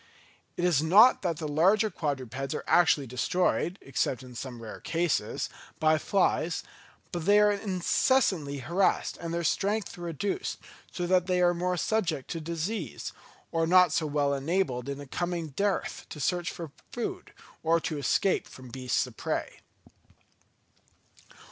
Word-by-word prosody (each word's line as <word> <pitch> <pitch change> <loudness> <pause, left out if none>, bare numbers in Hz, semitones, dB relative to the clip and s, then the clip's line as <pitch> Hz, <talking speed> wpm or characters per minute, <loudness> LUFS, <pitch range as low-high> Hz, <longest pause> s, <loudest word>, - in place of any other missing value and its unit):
It 175 - 0
is 165 -6 +3
not 205 +11 +6
that 170 -3 -1
the 155 - -4
larger 195 +9 +3
quadrupeds 135 -4 -3
are - - -4
actually 165 -5 +4
destroyed 175 +8 0
(except 130 -2 -1
in 125 -1 -11
some 120 0 -7
rare 110 - -8
cases) 165 -10 -1 0.3
by 155 0 +4
flies, 175 -3 +1 0.5
but 175 0 -4
they 205 +1 +6
are 210 0 +5
incessantly 190 - +1
harassed 185 +3 +1
and 170 -1 -5
their 170 0 -1
strength 200 +3 -1
reduced, 175 - -3 0.3
so 175 - -3
that 180 0 +2
they 180 -1 +2
are 175 0 +4
more 180 +1 -1
subject 170 -8 -1
to 165 - -3
disease, 170 - -4 0.4
or 165 0 +1
not 180 +1 +6
so 160 - +1
well 145 -1 +1
enabled 140 -3 -1
in 140 0 -4
a 145 - -7
coming 170 +2 -3
dearth 200 +7 -2
to 150 - -8
search 175 +3 0
for 165 -4 -7 0.2
food, 370 +10 -4 0.3
or 165 +1 +3
to 155 -3 -3
escape 185 +6 +1
from 130 -1 -12
beasts 130 +1 0
of - - -12
prey. - - -3
170 Hz, 150 wpm, -28 LUFS, 145-185 Hz, 0.5 s, not